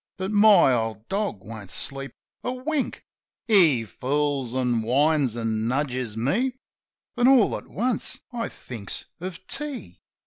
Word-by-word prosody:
But 190 +1 -3
my 205 -9 +6
old 110 -2 -2
dog 200 - -2
won't 110 -3 -9
sleep 135 +6 -3 0.3
a 250 - -1
wink; 270 +2 -2 0.4
He 165 - +5
fools, 135 +1 -1
an' 125 -3 +1
whines, 135 +1 +2
an' 110 -1 -1
nudges 125 -4 -1
me. 210 - +1 0.6
Then 245 +1 +3
all 260 -5 +5
at - - -8
once 250 +3 -2
I 230 -1 -2
thinks 110 -6 -7
of 185 +1 -7
tea. 275 - -6
140 Hz, 135 wpm, -25 LUFS, -, 0.6 s, my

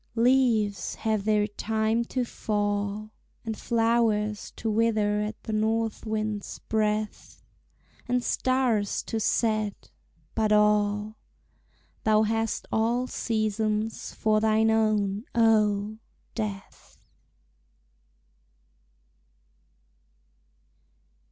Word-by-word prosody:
Leaves 230 -4 +2
have 215 -3 -1
their 210 -1 +3
time 220 +2 0
to 250 +1 -2
fall, 205 -1 -2 0.3
And 220 -1 -3
flowers 225 -3 +1
to 225 - -5
wither 215 -1 +2
at 210 +1 -5
the 220 - -4
north 220 +1 0
wind's 215 -1 -3
breath, 215 -1 -2 0.6
And 245 0 +1
stars 250 -6 +1
to 225 - -3
set 215 -1 0 0.4
but 220 -1 +1
all. 210 0 +2 0.9
Thou 215 0 +4
hast 225 0 -1
all 235 +3 +1
seasons 215 -2 -1
for 215 -1 +2
thine 220 0 +3
own, 215 -1 +1
oh! 215 -2 +2 0.3
Death. 210 -3 -6
215 Hz, 85 wpm, -27 LUFS, 210-225 Hz, 0.9 s, Thou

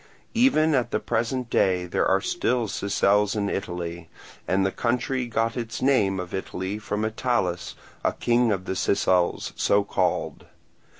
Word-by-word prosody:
Even 225 - +4
at 125 -4 +1
the - - 0
present 120 +2 -1
day 90 -1 +2
there 85 - 0
are 95 +1 +3
still 120 +2 0
Sicels 100 +1 +1
in 100 -1 -1
Italy; 85 -3 -5 0.4
and 95 +1 +2
the 95 - +1
country 125 +2 -1
got 115 0 0
its 115 -2 -4
name 105 -8 +2
of 90 -1 -6
Italy 95 +1 -4
from 105 0 -2
Italus, 110 -6 -1 0.3
a - - +2
king 120 -1 +2
of 95 -2 -2
the - - -2
Sicels, 90 -2 +1
so 100 0 +2
called. - - -1
105 Hz, 155 wpm, -25 LUFS, 95-120 Hz, 0.4 s, Even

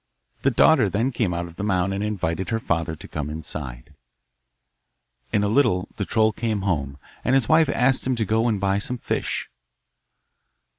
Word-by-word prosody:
The 135 - +3
daughter 130 -3 +4
then 115 +7 0
came 115 -6 0
out 85 0 -2
of 85 -1 -12
the 105 - -4
mound 95 -2 +1
and 100 +1 -2
invited 95 -4 -2
her 110 - 0
father 85 -5 -1
to - - -11
come 75 -1 -4
inside. 75 -4 -7 1.4
In 105 - +2
a - - +2
little 105 -5 +2
the 100 - -2
troll 110 +1 +2
came 110 -2 -2
home, 70 -8 -1 0.3
and 130 - +2
his 135 -4 +3
wife 160 0 +4
asked 130 +1 +2
him 130 - +1
to 115 -2 -1
go 110 +3 +1
and 110 -4 +1
buy 100 0 +1
some 125 +4 -3
fish. - - -2
100 Hz, 185 wpm, -24 LUFS, 85-115 Hz, 1.4 s, daughter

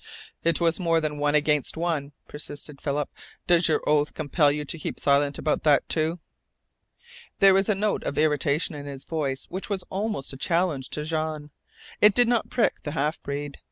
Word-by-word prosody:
"It 165 0 +2
was 170 0 +2
more 165 -2 +2
than 150 -2 -3
one 145 0 +2
against 150 0 +1
one," 160 -4 -1 0.2
persisted 145 -1 -8
Philip. 145 -1 -1 0.4
"Does 175 -1 +4
your 160 - +1
oath 150 0 +2
compel 150 -1 +2
you 150 +1 -3
to 160 +4 -3
keep - - -5
silent 140 0 +2
about 155 - 0
that, 150 -3 +3
too?" 160 +2 0 1.2
There 195 -1 +7
was 195 +1 +2
a 210 - +3
note 210 +2 0
of 145 - -3
irritation 150 +1 +1
in 145 -1 -7
his 140 -1 -7
voice 140 -5 -2
which 190 +3 -5
was 195 -2 -2
almost 200 -8 -2
a - - -8
challenge 165 -3 0
to 150 - -2
Jean. 155 -1 -3 0.5
It 210 -1 +6
did 245 -1 +5
not 235 -1 +1
prick 240 - +1
the 145 - -5
half 150 +1 -1
breed. 145 0 -5
150 Hz, 190 wpm, -25 LUFS, 145-170 Hz, 1.2 s, There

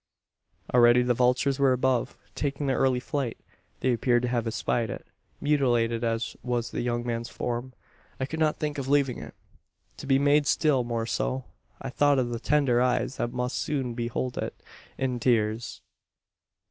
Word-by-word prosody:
Already 120 0 +6
the 125 0 +2
vultures 125 +3 +2
were 135 -2 +4
above 130 0 0 0.2
taking 140 0 -2
their 135 -1 +1
early 130 -2 +3
flight. 135 -2 -3 0.4
They 130 - +2
appeared 120 0 +2
to 125 - 0
have 120 -2 -1
espied 115 0 -1
it. - - -6 0.3
"Mutilated 120 -6 +1
as 115 0 -1
was 120 -2 -2
the - - -2
young 120 0 -1
man's 115 0 -3
form, 120 +1 -4 0.5
I 130 - 0
could 160 +4 -5
not 155 -1 +2
think 150 -1 -3
of 135 - -4
leaving 140 -2 +2
it, - - -10 0.6
to - - -8
be 135 -1 +4
made 145 +1 +3
still 145 -6 +3
more 115 -1 -2
so. 130 +2 -2 0.3
I 135 - -6
thought 145 +1 +3
of 125 -2 +1
the 120 -1 -3
tender 135 -4 +2
eyes 125 +1 0
that 120 - -2
must 125 +1 -2
soon 130 -5 -2
behold 120 +1 -3
it - - -5 0.3
in 125 -2 -1
tears." 115 -2 0
125 Hz, 170 wpm, -27 LUFS, 120-135 Hz, 0.6 s, Already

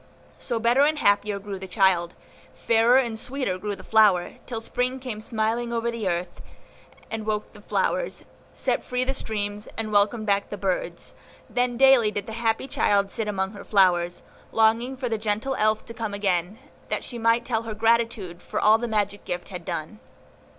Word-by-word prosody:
So 235 - -1
better 235 +4 +3
and 305 +2 +3
happier 205 -4 +2
grew 200 -1 -6
the 190 - -7
child, 180 -2 +2 0.4
fairer 230 +2 +4
and 235 -4 0
sweeter 250 -8 -3
grew 205 +1 -3
the - - -13
flower, 205 -5 +3
till 235 -3 -3
Spring 250 +3 -2
came 245 -5 -6
smiling 230 +1 -1
over 235 0 -1
the 230 -4 -3
earth, 175 0 -3 0.7
and 225 -1 -3
woke 215 -1 -3
the - - -14
flowers, - - -1 0.3
set - - -1
free 250 0 -1
the 265 +1 -1
streams, 210 -4 -4
and 220 -1 -3
welcomed 210 +2 +2
back 200 -1 +1
the 205 - -5
birds; 190 -1 -3 0.3
then 245 -1 0
daily 265 -4 +6
did 205 -1 -4
the 220 - -7
happy 225 +2 0
child 200 -6 +2
sit 220 - -2
among 190 -2 -1
her 205 - -10
flowers, 175 -3 +2 0.3
longing 230 +4 +2
for 255 -1 -2
the 225 -2 -1
gentle 215 +5 -1
Elf 215 0 +1
to 230 - -9
come 220 -3 -4
again, 190 0 0 0.3
that - - -1
she 240 - -6
might 230 +1 +2
tell 225 -3 0
her 225 -2 -6
gratitude 225 -5 +1
for - - -3
all 215 +1 +5
the 240 - -2
magic 205 -2 -1
gift 175 0 -5
had 180 -3 -7
done. 155 -9 -5
220 Hz, 185 wpm, -25 LUFS, 200-235 Hz, 0.7 s, daily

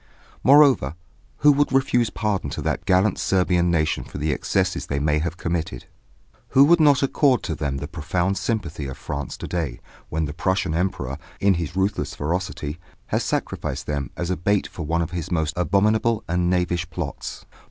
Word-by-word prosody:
Moreover, 135 - +5 0.5
who 150 - +7
would 145 +1 +2
refuse 125 -4 +2
pardon 105 -8 -2
to - - -5
that 85 - -2
gallant 95 +1 +3
Serbian 90 -2 +2
nation 80 -6 +1
for - - -9
the 75 +1 0
excesses - - -1
they 70 - -2
may 75 +1 +1
have 85 +2 -3
committed? 85 -2 -3 0.7
Who 135 - +10
would 170 +4 +5
not 145 -4 +5
accord 135 -1 +3
to - - -2
them 70 -2 -2
the 70 - -5
profound 90 +5 -1
sympathy 90 -10 -2
of 65 0 -7
France 70 0 -5
to - - -6
day, 80 -9 -3 0.3
when 80 0 -1
the 75 - -5
Prussian 95 0 0
Emperor, 80 -6 -2 0.2
in 100 0 +4
his 85 -1 -3
ruthless 95 +2 -1
ferocity, 85 -1 -3 0.3
has - - 0
sacrificed - - -3
them 70 -2 -2
as 85 +1 -2
a - - +1
bait 100 +5 +1
for 85 -4 -7
one 85 +1 +1
of 85 - -5
his 90 0 -4
most 80 -3 0
abominable 105 +5 +2
and 90 +1 +1
knavish 90 -2 0
plots? - - -6
90 Hz, 180 wpm, -23 LUFS, 75-100 Hz, 0.7 s, Who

